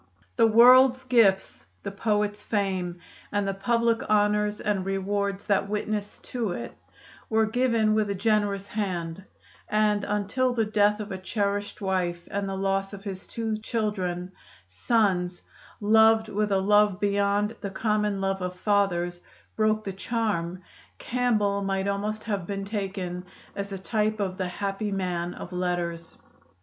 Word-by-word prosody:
The 225 - +5
world's 255 +3 +7
gifts 225 - +2 0.2
the 200 - -4
poet's 210 0 0
fame, 190 -4 -1 0.3
and 205 -1 0
the 195 - 0
public 230 +3 0
honors 210 0 +2
and 205 -3 -1
rewards 195 +1 -1
that 200 -1 +1
witnessed 210 0 -3
to 230 -7 -1
it - - -6 0.5
were 220 0 +3
given 230 -2 +2
with 215 -1 +1
a 200 - -1
generous 205 -1 0
hand; 185 -4 -3 0.5
and 210 -1 +2
until 210 +6 0
the 225 -2 +2
death 210 0 +2
of 210 -1 -6
a 190 - -4
cherished 205 +1 -2
wife 180 -3 -1
and 200 -1 -2
the 195 - -3
loss 195 +1 -1
of 200 -1 -9
his 190 -2 -6
two 225 -2 -3
children 190 -5 -2 0.4
sons, 180 - 0 0.4
loved 220 +1 +5
with 210 0 -1
a 195 - +4
love 205 0 +3
beyond 205 +1 +1
the 200 - -3
common 210 0 0
love 195 0 -1
of 180 0 -3
fathers 180 -3 0 0.3
broke 215 0 +2
the 195 - -4
charm, 190 -4 -2 0.3
Campbell 215 -5 0
might 195 0 -1
almost 210 +2 -2
have 200 -6 -3
been 195 -1 -3
taken 190 -3 -4 0.3
as 200 0 -4
a 195 - -4
type 215 +2 -1
of 190 -1 -2
the 185 - -1
happy 200 +3 -3
man 180 -3 -2
of 180 - -8
letters. 175 -2 -3
200 Hz, 150 wpm, -26 LUFS, 190-215 Hz, 0.5 s, world's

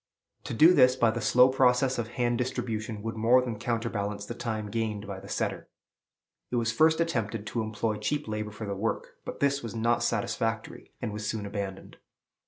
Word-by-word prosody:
To - - -4
do 160 +9 +7
this 125 -5 +6
by 115 -3 +3
the 120 +1 -4
slow 125 +4 +6
process 130 0 +3
of 115 - -2
hand 120 -1 +1
distribution 110 -4 -3
would 115 0 -3
more 115 +3 +5
than 120 -4 -3
counterbalance 110 -3 -2
the 120 - -5
time 110 -3 -4
gained 110 -2 -2
by 100 -1 -6
the 100 - -12
setter. - - -2 0.8
It - - -3
was 115 -1 +1
first 160 +7 +4
attempted 115 -10 -1
to 115 +3 -2
employ 110 0 -2
cheap 145 +8 -2
labor 105 0 -3
for 105 +1 -7
the 100 - -3
work; 105 +4 -3
but - - -7
this 140 0 +2
was 115 -1 -6
not 115 +1 +1
satisfactory, 115 0 -2
and 110 -3 -2
was 105 0 -3
soon 110 -2 -3
abandoned. 100 -1 -6
115 Hz, 190 wpm, -28 LUFS, 105-125 Hz, 0.8 s, do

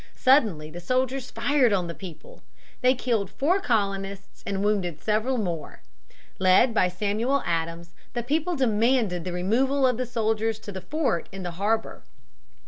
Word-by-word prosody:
Suddenly 215 - +3
the 175 - -7
soldiers 255 +6 -1
fired 245 +1 +2
on 190 -3 +1
the 170 - -5
people. 190 - -11 0.4
They 255 +1 +4
killed 230 -6 -1
four 310 - +1
colonists 200 - -2
and 195 0 -1
wounded 190 -7 0
several 220 +5 0
more. 170 -8 -4 0.6
Led 185 +6 +5
by 185 - +3
Samuel 215 +9 0
Adams, 170 0 -2 0.2
the 240 - -2
people 315 +7 0
demanded 225 - +1
the 180 - -3
removal 255 +10 +1
of 250 -3 +2
the 255 0 -2
soldiers 225 -2 0
to 205 - -7
the 190 -1 -6
fort 290 - -1
in 195 -1 -7
the 175 - -3
harbor. 210 +6 -1
215 Hz, 155 wpm, -26 LUFS, 185-255 Hz, 0.6 s, Led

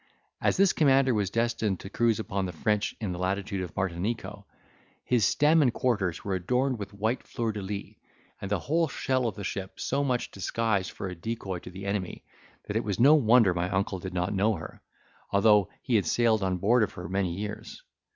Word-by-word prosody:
As - - +2
this 195 -1 +4
commander 135 -3 +4
was 100 -4 0
destined 115 -3 0
to 95 - -8
cruise 115 -1 +2
upon 100 -3 -2
the - - -4
French 105 +5 -1
in 105 -5 -3
the 90 - -5
latitude 95 +1 -2
of 90 -3 -6
Martinico, 95 +5 -3 0.6
his 120 -5 +3
stem 155 +8 +4
and 130 -4 +4
quarters 100 -9 -1
were 100 - -2
adorned 125 +7 0
with 100 - -6
white 110 +5 -1
fleurs 115 -3 -3
de 105 - -5
lis, 100 +1 -5 0.5
and 100 - -4
the 105 - +1
whole 165 +2 +1
shell 130 -2 0
of 110 - -3
the 100 - -7
ship 95 0 -5
so 140 +2 0
much 125 -3 -1
disguised 100 0 -1
for 95 - -6
a 90 - -5
decoy 95 -1 -4
to - - -10
the 95 +2 -9
enemy, 100 -2 -3 0.4
that 100 - -5
it 115 - +1
was 100 -1 -3
no 140 +6 +7
wonder 115 -8 +5
my 85 +1 -1
uncle 95 0 -1
did 95 +1 -6
not 90 +2 0
know 105 +3 +2
her, 80 -1 -9 0.5
although 105 -1 +4
he 120 -4 +2
had 95 -6 0
sailed 115 +2 +2
on 95 -1 0
board 115 +7 +3
of 105 - 0
her 90 0 -7
many 95 -1 -1
years. 105 - -6
105 Hz, 210 wpm, -28 LUFS, 95-120 Hz, 0.6 s, no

